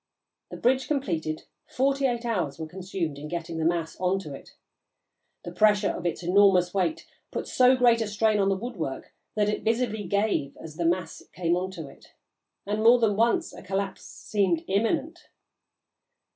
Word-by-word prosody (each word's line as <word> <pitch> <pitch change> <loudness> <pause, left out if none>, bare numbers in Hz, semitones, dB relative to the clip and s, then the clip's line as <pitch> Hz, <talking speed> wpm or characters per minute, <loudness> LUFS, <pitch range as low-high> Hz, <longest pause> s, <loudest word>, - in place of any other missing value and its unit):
The - - -7
bridge 260 +2 +2
completed, 165 - -2 0.2
forty 275 +1 +1
eight 240 -1 -2
hours 180 -12 -1
were 160 - -5
consumed 175 -3 -4
in 150 - -7
getting 165 0 -4
the 160 - 0
mass 165 -1 0
on 185 +1 +1
to 150 -6 -8
it. 135 - -12 0.9
The 175 - -6
pressure 210 +1 +3
of 175 - -3
its 170 +1 -3
enormous 180 -1 +4
weight 200 - -1 0.2
put - - -4
so 255 0 +5
great 240 -2 +4
a 225 - -1
strain 210 +1 +1
on 195 0 +3
the 195 - +1
woodwork 190 - -5 0.2
that 210 -1 +2
it 210 - -1
visibly 220 -2 0
gave 200 -7 0
as 155 -1 -10
the 170 - -1
mass 170 -1 -1
came 170 -1 +1
on 185 +1 -2
to 160 -5 -7
it, - - -17 0.5
and 210 +2 -1
more 235 +2 +8
than 220 -4 +2
once 235 - +1
a - - -10
collapse 195 0 -3
seemed 190 -6 -1
imminent. 290 - -1
195 Hz, 175 wpm, -26 LUFS, 170-230 Hz, 0.9 s, more